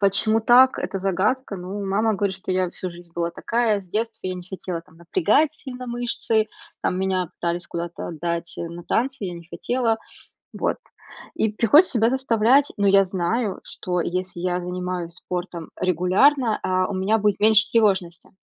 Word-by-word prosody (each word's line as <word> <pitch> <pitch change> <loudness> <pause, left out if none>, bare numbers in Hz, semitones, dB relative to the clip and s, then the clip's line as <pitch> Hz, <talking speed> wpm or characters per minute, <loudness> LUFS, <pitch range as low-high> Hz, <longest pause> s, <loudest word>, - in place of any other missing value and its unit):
Почему 210 +3 +3
так- 250 +3 +6
это 195 - -3
загадка. 195 +6 0
Ну, 190 +3 -5
мама 210 +3 +1
говорит, 195 -1 -1
что 190 0 -7
я 185 0 +1
всю 185 0 -4
жизнь 170 0 -14
была 170 0 -1
такая, 220 +2 0
с 185 - -22
детства 220 +3 -2
я 185 - -2
не 180 - -7
хотела, 180 -1 -5
там, 165 -1 -23
напрягать 305 - +2
сильно 255 -4 -8
мышцы, 235 -2 0 0.3
там, 180 - 0
меня 185 -2 0
пытались 170 0 -3
куда-то 170 0 -5
отдать, 170 +1 -4
э, 170 - -4
на 170 +1 -8
танцы, 260 +4 -1
я 175 - -5
не 170 -1 -11
хотела. 235 +2 0 0.5
Вот, - - -1 0.6
и 220 - +1
приходится 240 - +5
себя 225 0 +3
заставлять, 260 +1 +3
но 205 - +1
я 195 0 +6
знаю, 190 +4 -1
что 180 -1 -3
если 180 +1 -3
я 180 0 0
занимаюсь 180 -1 -4
спортом 175 -2 -6
регулярно, 195 - +3
а, 185 0 +1
у 200 - -4
меня 195 +4 +2
будет 205 -1 +1
меньше 220 +1 +5
тревожности. 190 -7 +1
195 Hz, 175 wpm, -23 LUFS, 180-225 Hz, 0.6 s, так